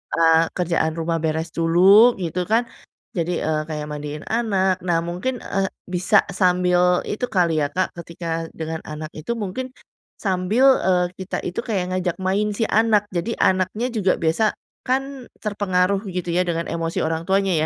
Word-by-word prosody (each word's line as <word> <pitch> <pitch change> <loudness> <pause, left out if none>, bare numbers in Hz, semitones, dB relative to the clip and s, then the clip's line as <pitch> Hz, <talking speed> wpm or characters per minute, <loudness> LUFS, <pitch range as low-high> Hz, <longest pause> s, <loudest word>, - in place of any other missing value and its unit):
eee, 165 -1 +5 0.2
kerjaan 170 -3 0
rumah 165 0 -1
beres 160 +1 -1
dulu 190 +8 +6
gitu 180 +1 -2
kan, 235 +2 +3 0.5
jadi, 175 0 -1
eee, 155 -1 +1
kayak 150 -1 -4
mandiin 150 0 -6
anak. 195 -5 +1
Nah, 175 -2 +1
mungkin, 180 +10 -3
eee, 195 -2 -1 0.2
bisa 185 +3 +3
sambil 180 -1 +3
itu 215 +4 -2
kali 170 -5 +2
ya, - - +1
Kak, 185 - -1
ketika 165 -1 -4
dengan 160 0 -5
anak 155 0 -6
itu 155 +9 -5
mungkin 235 +6 -4 0.5
sambil, 195 +6 +1 0.2
eee, 180 -1 +2
kita 190 0 -3
itu 180 - -4
kayak 200 -6 -1
ngajak 180 -2 -1
main 200 +3 +1
si 225 - -1
anak. 215 -1 +3
Jadi 175 +7 -1
anaknya 190 +6 +1
juga 195 -4 +2
biasa 170 +7 +2 0.3
kan 270 0 -2
terpengaruh 200 -2 +1
gitu 180 -1 -4
ya, 180 - +3
dengan 170 -1 -2
emosi 165 0 -2
orang 160 +1 -2
tuanya 195 +1 +1
180 Hz, 160 wpm, -22 LUFS, 165-200 Hz, 0.5 s, dulu